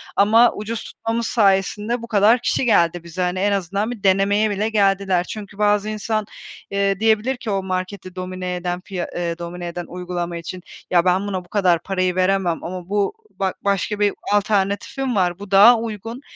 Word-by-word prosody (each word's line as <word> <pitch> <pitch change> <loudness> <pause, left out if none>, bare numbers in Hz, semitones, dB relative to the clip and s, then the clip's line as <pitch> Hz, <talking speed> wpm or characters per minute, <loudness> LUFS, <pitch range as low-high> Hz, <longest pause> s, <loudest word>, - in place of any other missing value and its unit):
ama 225 +4 +5
ucuz 220 +2 -5
tutmamız 225 0 -3
sayesinde 210 +2 +1
bu 235 - -7
kadar 220 +2 +4
kişi 255 - 0
geldi 175 -6 +2
bize. 170 +2 -6
Hani, 180 +1 0
en 205 +2 +2
azından 200 +3 -1
bir 230 -5 -8
denemeye 200 +2 +3
bile 205 +2 -1
geldiler. 195 -4 +2
Çünkü 205 +1 -8
bazı 210 0 +2
insan, 215 0 -2 0.5
eee, 200 -1 +1
diyebilir 225 +4 +2
ki 230 -3 -5
o 195 -1 -1
marketi 185 0 -4
domine 185 0 -4
eden 180 0 -3
piya 185 -2 -5
ııı, 170 -1 -2
domine 175 +1 -6
eden 175 0 -5
uygulama 175 -1 -4
için, 175 +2 -7 0.3
"Ya 175 -1 +4
ben 185 +2 +2
buna 185 -3 -3
bu - - -24
kadar 180 -4 +2
parayı 185 -2 -1
veremem 185 -2 +1
ama 180 +1 -6
bu 205 - 0 0.3
ba 190 -1 0
başka 200 +1 -1
bir 205 -1 +2 0.2
alternatifim 205 +5 0
var, 180 -2 +1
bu 205 -1 -10
daha 210 +5 +8
uygun, 225 +2 -6
195 Hz, 180 wpm, -21 LUFS, 180-210 Hz, 0.5 s, daha